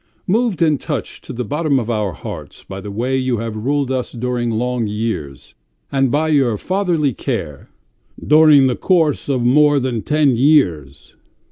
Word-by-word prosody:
Moved 210 -2 +1
and 155 -4 +1
touched - - -5
to - - -8
the 125 - -4
bottom 145 +4 0
of 120 -4 -2
our 105 -5 -1
hearts - - -9
by 95 0 -8
the 105 - -8
way 120 +6 -2
you 130 -2 0
have 115 0 -4
ruled 135 +4 -1
us 130 -1 -2
during 120 0 -2
long 120 0 -1
years, 105 - -5 0.4
and 135 -1 +1
by 155 +5 0
your 135 -8 +2
fatherly 175 - 0
care... 75 -8 -5 0.3
." - - -23
"During 150 -3 +7
the 125 -2 +1
course 160 -7 +1
of 130 -3 0
more 145 +3 +4
than 125 -4 -2
ten 150 -2 +2
years. 105 - +1
130 Hz, 170 wpm, -18 LUFS, 115-150 Hz, 0.4 s, During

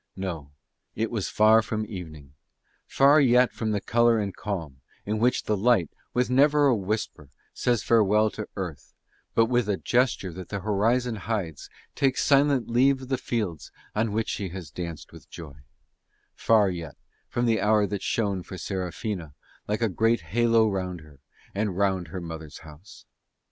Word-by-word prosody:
No, 85 -7 -5 0.5
it 115 0 -2
was 110 -5 -2
far 110 +1 +5
from 110 0 -3
evening; 80 -9 -9 0.5
far 140 +3 +5
yet 125 -1 +4
from 110 - -3
the 105 -1 0
colour 120 +2 +3
and 100 -3 -3
calm 80 -10 -5 0.2
in 105 +1 -1
which 125 +3 +2
the 105 - 0
light 105 -5 +2 0.2
with 125 0 +1
never 145 +3 +4
a 135 -4 +4
whisper 100 -8 -4 0.2
says 120 -3 0
farewell 110 -1 +3
to 105 - -6
Earth, 90 -8 -7 0.4
but 115 - +5
with 120 -1 0
a 100 - +1
gesture 120 -8 0
that 90 +1 -9
the 100 -2 -4
horizon 110 +4 +1
hides 100 -8 -4 0.2
takes 135 -1 +1
silent 140 -4 +3
leave 130 +3 +2
of 130 - -10
the 130 - +1
fields 100 - -3 0.2
on 110 0 0
which 110 +2 -1
she 100 -2 -3
has 85 -5 -8
danced 85 -2 -7
with - - -14
joy; 80 -5 -10 0.8
far 110 -3 +3
yet 85 -5 -7 0.3
from 120 - -1
the 115 -2 +2
hour 105 0 +3
that 100 -1 -4
shone 100 -5 -1
for 95 - -9
Serafina 90 -4 -4 0.3
like 105 +3 -1
a - - +3
great 115 +2 +1
halo 115 +6 +2
round 90 -4 -3
her 75 -3 -17 0.3
and 100 -2 -2
round 95 -3 +1
her 90 +4 -6
mother's 80 -3 -8
house. 80 +6 -14
105 Hz, 170 wpm, -26 LUFS, 90-115 Hz, 0.8 s, far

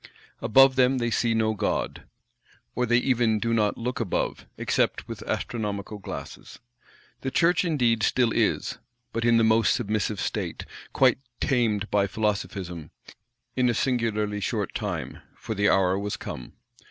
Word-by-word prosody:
Above 135 +3 +5
them 130 +1 +4
they 120 -1 -1
see 115 +2 +1
no 110 -1 +2
God; 105 -1 -2 0.7
or 125 0 0
they 120 +1 +4
even 120 -3 +2
do 115 +2 -1
not 105 -2 +1
look 125 +3 -3
above, 115 -7 -2
except - - 0
with - - -7
astronomical 105 -2 -3
glasses. - - -8 0.6
The 135 - -3
Church 170 +6 +3
indeed 125 -10 +1
still 120 +3 +2
is; - - 0 0.3
but 115 - -1
in 120 -1 +4
the 115 - +4
most 110 0 +4
submissive 105 -2 -1
state; - - -3 0.3
quite 130 -2 +4 0.2
tamed 110 -6 0
by 100 -1 +3
Philosophism; 95 -5 -3 0.7
in 125 -1 +3
a 120 - +1
singularly 110 -5 0
short 100 - -2
time; - - -4 0.2
for 110 - -5
the 100 0 +2
hour 95 0 +3
was 105 0 -3
come. 65 - -8
115 Hz, 150 wpm, -26 LUFS, 105-125 Hz, 0.7 s, Above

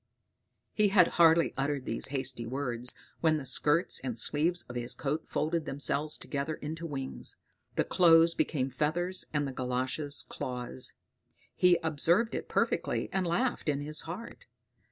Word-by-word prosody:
He 210 -1 +3
had 190 -3 +5
hardly 165 0 +6
uttered 140 -1 -1
these 115 - -3
hasty 130 -3 -3
words 125 -2 -4 0.2
when 160 -1 +3
the 145 - -6
skirts 150 +6 +2
and 125 -3 -4
sleeves 160 +8 0
of 125 - -10
his 120 0 -3
coat 150 +3 -3
folded 160 +1 -1
themselves 145 +2 -1
together 145 +2 -3
into 160 +3 -6
wings; 135 -3 -5 0.4
the - - +2
clothes 165 -1 +5
became 135 -5 -1
feathers, 175 +7 -1
and 145 -2 0
the - - -4
galoshes 130 +3 0
claws. 125 0 0 0.6
He 180 -1 +5
observed 165 +8 +2
it - - -4
perfectly, - - 0
and 190 -2 0
laughed 240 +1 0
in 145 -1 0
his 150 +1 -1
heart. 180 +8 -8
150 Hz, 150 wpm, -30 LUFS, 135-170 Hz, 0.6 s, hardly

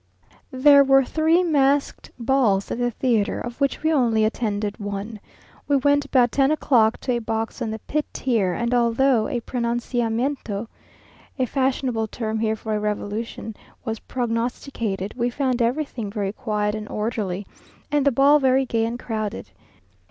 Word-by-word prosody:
_ - - -28 0.2
There 280 +2 +6
were 270 0 +5
three 320 +5 +2
masked 285 -4 +1
balls 235 -6 +1
at - - -3
the 245 0 +1
theatre, 230 -3 0
of 240 +3 -7
which 275 +2 0
we 320 0 +2
only 230 -6 +3
attended 210 -2 -2
one. 205 +1 -5 0.5
We 285 - +3
went 285 +1 +3
about 245 -3 +3
ten 275 -1 +3
o'clock 240 -7 +3
to 255 - -2
a 240 - +1
box 225 +2 -3
on 230 - -1
the 220 - -3
pit 300 +7 -3
tier, 225 -8 0
and 235 +6 -1
although 240 0 +3
a 240 - -2
pronunciamento 235 -1 -2 0.7
(a 260 - +1
fashionable 255 -3 0
term 220 0 -3
here 220 0 0
for 220 0 -4
a 210 - 0
revolution) 210 +1 -4 0.3
was 225 -2 -3
prognosticated, 230 -4 -3
we 240 -1 -1
found 255 -1 -1
everything 240 -3 -1
very 200 -1 -3
quiet 210 -2 -1
and 215 0 -6
orderly, 210 -3 -3 0.5
and 295 -1 +2
the 280 - +4
ball 280 +4 +5
very 265 0 +3
gay 225 -2 0
and 235 +1 -4
crowded. 215 - -4
235 Hz, 160 wpm, -23 LUFS, 220-270 Hz, 0.7 s, There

